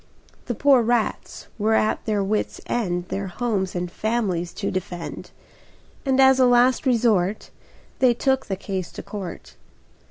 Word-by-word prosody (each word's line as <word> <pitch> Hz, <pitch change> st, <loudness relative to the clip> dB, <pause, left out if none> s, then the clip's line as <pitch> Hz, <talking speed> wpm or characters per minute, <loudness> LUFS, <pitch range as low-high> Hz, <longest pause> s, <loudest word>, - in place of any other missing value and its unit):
The 240 Hz, -, -2 dB
poor 275 Hz, +1 st, +5 dB
rats 235 Hz, -1 st, -1 dB
were 220 Hz, +2 st, +2 dB
at 215 Hz, -, +1 dB
their 210 Hz, -2 st, 0 dB
wits' 210 Hz, +2 st, -2 dB
end 180 Hz, -6 st, -2 dB
Their 195 Hz, 0 st, -3 dB
homes 190 Hz, -1 st, -2 dB
and 175 Hz, 0 st, -3 dB
families 200 Hz, -7 st, -1 dB
to -, -, -3 dB
defend; 180 Hz, -2 st, -5 dB, 0.8 s
And 265 Hz, 0 st, +2 dB
as 265 Hz, 0 st, +6 dB
a 255 Hz, -, +6 dB
last 245 Hz, +2 st, +3 dB
resort 220 Hz, -5 st, +1 dB, 0.5 s
They 250 Hz, -2 st, +4 dB
took 265 Hz, +2 st, 0 dB
the 195 Hz, -, -2 dB
case 190 Hz, -2 st, -5 dB
to -, -, -8 dB
court. 195 Hz, -5 st, -8 dB
215 Hz, 150 wpm, -23 LUFS, 185-245 Hz, 0.8 s, as